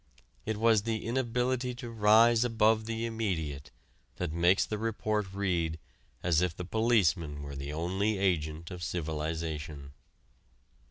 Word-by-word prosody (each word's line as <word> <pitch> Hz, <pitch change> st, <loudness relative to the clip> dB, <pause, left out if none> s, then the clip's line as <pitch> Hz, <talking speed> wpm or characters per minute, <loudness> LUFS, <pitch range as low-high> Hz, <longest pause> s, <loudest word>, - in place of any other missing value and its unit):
It 110 Hz, -1 st, -1 dB
was 110 Hz, -1 st, +4 dB
the 110 Hz, 0 st, -3 dB
inability 125 Hz, +1 st, -1 dB
to 120 Hz, -1 st, -7 dB
rise 115 Hz, +2 st, +5 dB
above 110 Hz, -2 st, +2 dB
the 115 Hz, 0 st, -2 dB
immediate 80 Hz, -, -3 dB, 0.5 s
that 75 Hz, -, -3 dB
makes 85 Hz, +3 st, +3 dB
the 105 Hz, -, -4 dB
report 110 Hz, -3 st, -1 dB
read 90 Hz, -5 st, -1 dB, 0.5 s
as 85 Hz, -2 st, +3 dB
if 90 Hz, -3 st, -1 dB
the 90 Hz, -, -5 dB
policeman 90 Hz, -10 st, +1 dB
were 70 Hz, -1 st, -7 dB
the 70 Hz, +1 st, -5 dB
only 95 Hz, +7 st, -1 dB
agent 80 Hz, -3 st, -1 dB
of 90 Hz, -1 st, -7 dB
civilization. 80 Hz, -3 st, -4 dB
95 Hz, 130 wpm, -30 LUFS, 80-115 Hz, 0.5 s, rise